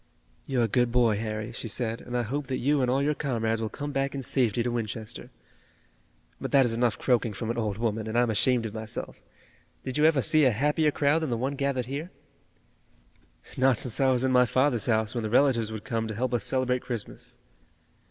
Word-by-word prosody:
"You're 125 -3 +1
a - - +2
good 120 +2 +1
boy, 120 -3 +3
Harry," 110 +1 -4
she 115 - -4
said, 115 +1 -3
"and 125 0 -4
I 120 - 0
hope 140 +5 -3
that 130 -1 -2
you 145 +2 +1
and 125 - +1
all 135 +2 +1
your 150 +1 +2
comrades 115 -6 -1
will 110 - -2
come 145 +4 -5
back 135 0 -1
in 135 - -4
safety 120 -2 +1
to 120 - -1
Winchester. 110 -2 -5 1.1
But - - -3
that 135 -2 +5
is 115 - -1
enough 120 -1 +1
croaking 120 -3 +1
from 110 +3 -3
an 120 - -5
old 105 -3 -2
woman 110 -1 -2
and 110 +2 -2
I'm 120 -1 +3
ashamed 120 +2 +2
of 110 - -5
myself. 110 -1 -6 0.6
Did 130 +2 -3
you 150 - +5
ever 155 -5 +4
see 155 -1 +4
a - - +6
happier 150 +6 +2
crowd 145 +2 +2
than 160 -3 -3
the 120 - -1
one 130 +4 -2
gathered 140 -3 -1
here?" 140 +7 -5 1.5
"Not 130 -2 +3
since 120 -1 +1
I 135 -1 +4
was 125 0 +1
in 130 - +2
my 125 -1 +5
father's 130 -2 +1
house 110 -1 +1
when 120 -2 -2
the 110 - -2
relatives 120 -3 +3
would 110 -1 -6
come 115 -1 -2
to 110 - -5
help 125 +3 -2
us 120 -5 +1
celebrate 130 -1 0
Christmas." 120 +1 -6
125 Hz, 220 wpm, -27 LUFS, 115-135 Hz, 1.5 s, a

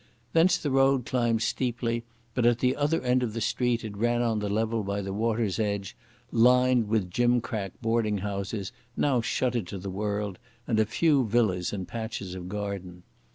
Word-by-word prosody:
Thence 175 +2 +5
the 145 -5 -3
road 135 -1 +3
climbed 120 -4 +1
steeply, 115 -2 -1 0.3
but 125 - 0
at 120 0 +4
the 125 +1 +1
other 150 +3 +1
end 125 0 +2
of 115 -4 -2
the 115 - -3
street 120 +1 0
it 105 -2 -6
ran 120 +3 +1
on 115 -2 +1
the 105 -1 -2
level 110 +2 0
by 100 0 -2
the 95 0 -4
water's 110 -1 0
edge, 100 -3 -2 0.4
lined 125 0 +4
with 105 -4 0
gimcrack 120 -3 0
boarding 115 -2 +1
houses, 100 0 -3 0.3
now 135 -4 +2
shuttered 120 -3 -1
to 100 - -5
the 95 +1 -5
world, 100 -1 -2 0.3
and 110 -3 +1
a 110 - +3
few 140 +2 +2
villas 100 -6 +1
in 95 -3 -4
patches 110 -5 -5
of 90 -1 -7
garden. 95 -3 -5
115 Hz, 180 wpm, -27 LUFS, 100-120 Hz, 0.4 s, Thence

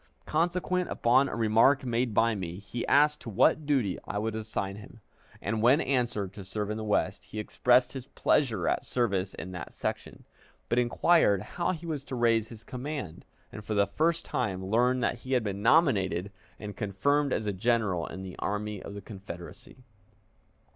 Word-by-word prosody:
Consequent 180 +3 0
upon 130 +4 +3
a - - -4
remark 115 +5 +4
made 120 0 0
by 115 +2 +3
me, 90 -4 -5
he 110 +4 -5
asked 150 +1 +4
to - - -7
what 145 +8 +3
duty 125 -11 +1
I - - -4
would 110 +1 -1
assign 100 -3 -3
him, 105 +2 -13 0.4
and, 110 +1 -2
when 125 +6 +5
answered, 120 - -1
to 100 - -9
serve 105 +2 -4
in 110 - -3
the 110 - -4
West, 105 -1 0
he - - -10
expressed 125 +3 +2
his 135 -1 -7
pleasure 115 - +1
at - - +1
service 100 -6 -1
in 90 +3 -7
that 90 -2 -7
section, - - -5 0.5
but 120 - +2
inquired 120 - +3
how 175 - -2
he 170 -1 -8
was 155 -4 -3
to 135 - -5
raise 115 -2 +2
his 110 -2 -11
command, 130 - -6 0.3
and 105 - -8
for 105 +1 -3
the 100 0 +4
first 160 +11 0
time 95 -7 -2
learned 125 +5 +2
that 120 - 0
he 130 +2 -4
had 125 -3 +2
been 100 -1 -3
nominated 105 - +3 0.3
and 105 -1 -7
confirmed 140 +8 0
as 110 - -1
a 105 - -1
general 105 -4 0
in 95 - -7
the 95 -2 -8
Army 105 -1 -3
of 100 - -8
the 100 - -6
Confederacy. 95 +3 -10
115 Hz, 185 wpm, -29 LUFS, 100-130 Hz, 0.5 s, when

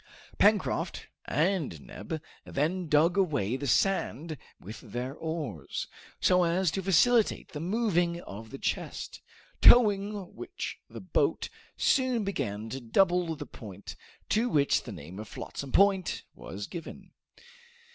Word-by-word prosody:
Pencroft - - +2 0.2
and 155 - 0
Neb 155 - -7 0.2
then 170 +5 -1
dug 160 +5 +4
away 145 - +1
the 140 +1 -3
sand 165 -1 +1 0.2
with 105 +4 -9
their 125 +3 -5
oars, 150 - -4 0.3
so 180 0 +4
as 175 0 +2
to 195 - -2
facilitate 210 +5 +3
the 150 - -6
moving 175 -2 +1
of 110 - -9
the 135 - -7
chest, - - -3 0.4
towing 205 -4 +5
which 365 - -6
the - - -8
boat - - 0 0.3
soon 255 -4 +2
began 110 - -3
to 135 - -4
double 175 - +2
the 145 -1 -7
point, 105 -9 -10 0.3
to 230 +3 +2
which 140 -8 +3
the - - -8
name 85 +7 -9
of 110 - -7
Flotsam 140 +5 -7
Point 195 -2 +3
was 100 +1 -7
given. 170 +8 -9
165 Hz, 130 wpm, -29 LUFS, 130-195 Hz, 0.4 s, towing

